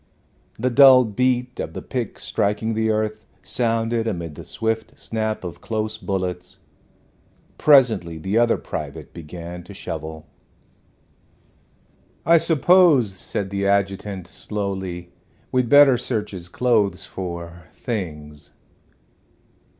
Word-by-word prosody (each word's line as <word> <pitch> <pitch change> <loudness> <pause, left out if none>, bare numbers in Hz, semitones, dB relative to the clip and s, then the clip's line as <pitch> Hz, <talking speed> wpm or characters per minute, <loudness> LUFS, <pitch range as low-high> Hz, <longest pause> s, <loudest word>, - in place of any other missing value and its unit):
The 125 +3 0
dull 130 -1 +8
beat 125 +3 0
of - - -4
the - - -6
pick 125 -5 -4
striking 105 +2 -1
the 110 0 0
earth 110 0 -1 0.2
sounded 115 -1 0
amid 85 -6 -4
the - - -10
swift 110 0 -3
snap 110 -2 -3
of 90 -2 -7
close 110 -1 -3
bullets. 90 -2 -3 1.0
Presently 115 - +4
the 95 +6 -3
other 120 0 +3
private - - -7
began 85 +2 -8
to 100 +3 -12
shovel. 80 -4 -6 2.0
"I 165 +2 +6
suppose," 160 - +4
said 95 +1 -4
the 100 0 -1
adjutant, 100 -1 -1
slowly, 95 -3 -5 0.4
"we'd 125 -2 +1
better 145 -3 +7
search 105 -1 -2
his 90 -3 -8
clothes 110 -3 +1
for 85 -2 -7
things." 75 - -6
105 Hz, 110 wpm, -22 LUFS, 90-120 Hz, 2.0 s, dull